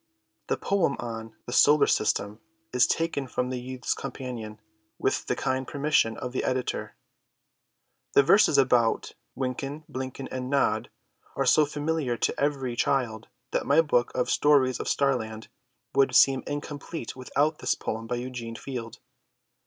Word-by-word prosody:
The -, -, 0 dB
poem 195 Hz, -8 st, +1 dB
on 115 Hz, -1 st, -6 dB
"The 120 Hz, -, -6 dB
Solar 150 Hz, +3 st, +6 dB
System" 105 Hz, 0 st, 0 dB, 0.3 s
is 125 Hz, 0 st, +5 dB
taken 165 Hz, -5 st, -1 dB
from 125 Hz, +1 st, -2 dB
the 125 Hz, -, -3 dB
Youth's 130 Hz, -1 st, -3 dB
Companion, 115 Hz, -5 st, -6 dB, 0.4 s
with -, -, -1 dB
the -, -, 0 dB
kind 130 Hz, 0 st, -1 dB
permission 145 Hz, -6 st, +1 dB
of 125 Hz, -, -5 dB
the 130 Hz, -, -2 dB
editor. 130 Hz, -1 st, -2 dB, 1.2 s
The 140 Hz, -, +6 dB
verses 200 Hz, +10 st, +5 dB
about 125 Hz, -4 st, +3 dB, 0.3 s
"Wynken, 135 Hz, +3 st, -3 dB
Blynken, 130 Hz, +1 st, -5 dB
and 130 Hz, 0 st, -4 dB
Nod" 120 Hz, -6 st, +1 dB, 0.5 s
are -, -, 0 dB
so 155 Hz, -1 st, +5 dB
familiar 145 Hz, -4 st, -1 dB
to -, -, -1 dB
every 135 Hz, -4 st, 0 dB
child 120 Hz, -4 st, 0 dB, 0.2 s
that -, -, -1 dB
my 145 Hz, +3 st, +5 dB
book 135 Hz, -7 st, +2 dB
of 125 Hz, -, 0 dB
Stories 140 Hz, -4 st, +3 dB
of -, -, -4 dB
Starland 110 Hz, -6 st, -1 dB, 0.4 s
would 135 Hz, 0 st, +3 dB
seem 135 Hz, -1 st, +6 dB
incomplete 145 Hz, -1 st, -5 dB
without 145 Hz, +4 st, 0 dB
this -, -, +1 dB
poem 110 Hz, +1 st, -4 dB
by 125 Hz, -, -1 dB
Eugene 120 Hz, -2 st, -5 dB
Field. 120 Hz, -3 st, -6 dB
130 Hz, 145 wpm, -27 LUFS, 120-140 Hz, 1.2 s, Solar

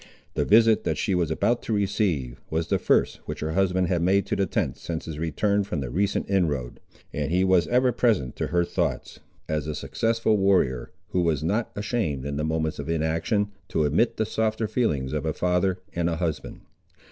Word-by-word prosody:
The -, -, 0 dB
visit 110 Hz, +1 st, +5 dB
that -, -, -1 dB
she 100 Hz, -, 0 dB
was 85 Hz, -3 st, +1 dB
now -, -, +1 dB
about 120 Hz, +7 st, +1 dB
to 115 Hz, -, -3 dB
receive, 95 Hz, -, 0 dB
was 80 Hz, +1 st, -2 dB
the -, -, +2 dB
first -, -, +2 dB
which -, -, -5 dB
her 80 Hz, +1 st, -2 dB
husband 95 Hz, 0 st, +1 dB
had 85 Hz, -1 st, 0 dB
made 95 Hz, +3 st, +3 dB
to -, -, -1 dB
the 100 Hz, -, +1 dB
tent -, -, -1 dB
since 80 Hz, -2 st, -5 dB
his 80 Hz, -2 st, -6 dB
return 100 Hz, +6 st, +1 dB
from 90 Hz, -5 st, -3 dB
the 65 Hz, -3 st, -4 dB
recent 100 Hz, +6 st, 0 dB
inroad, 75 Hz, -11 st, 0 dB, 0.3 s
and 75 Hz, -1 st, -2 dB
he 90 Hz, +2 st, +3 dB
was 95 Hz, -2 st, +3 dB
ever 125 Hz, +1 st, +3 dB
present 110 Hz, -, +1 dB
to -, -, -1 dB
her 85 Hz, 0 st, +1 dB
thoughts, -, -, -2 dB, 0.3 s
as 75 Hz, -1 st, -2 dB
a 75 Hz, -, -3 dB
successful 110 Hz, +11 st, 0 dB
warrior, 95 Hz, -11 st, +2 dB, 0.2 s
who 90 Hz, -, +1 dB
was 80 Hz, -3 st, +1 dB
not 105 Hz, +8 st, 0 dB
ashamed, 100 Hz, -, -2 dB
in 70 Hz, 0 st, -3 dB
the 75 Hz, -, -2 dB
moments 80 Hz, 0 st, -1 dB
of 75 Hz, +2 st, -5 dB
inaction, 85 Hz, +6 st, 0 dB, 0.2 s
to 80 Hz, -, 0 dB
admit 75 Hz, +11 st, +2 dB
the 110 Hz, -, +1 dB
softer 110 Hz, 0 st, -1 dB
feelings 75 Hz, -, 0 dB
of 75 Hz, -, -1 dB
a 80 Hz, -1 st, -1 dB
father 90 Hz, +2 st, +1 dB, 0.2 s
and 85 Hz, 0 st, 0 dB
a 85 Hz, -, -1 dB
husband. 80 Hz, -3 st, -3 dB
85 Hz, 205 wpm, -25 LUFS, 75-100 Hz, 0.3 s, visit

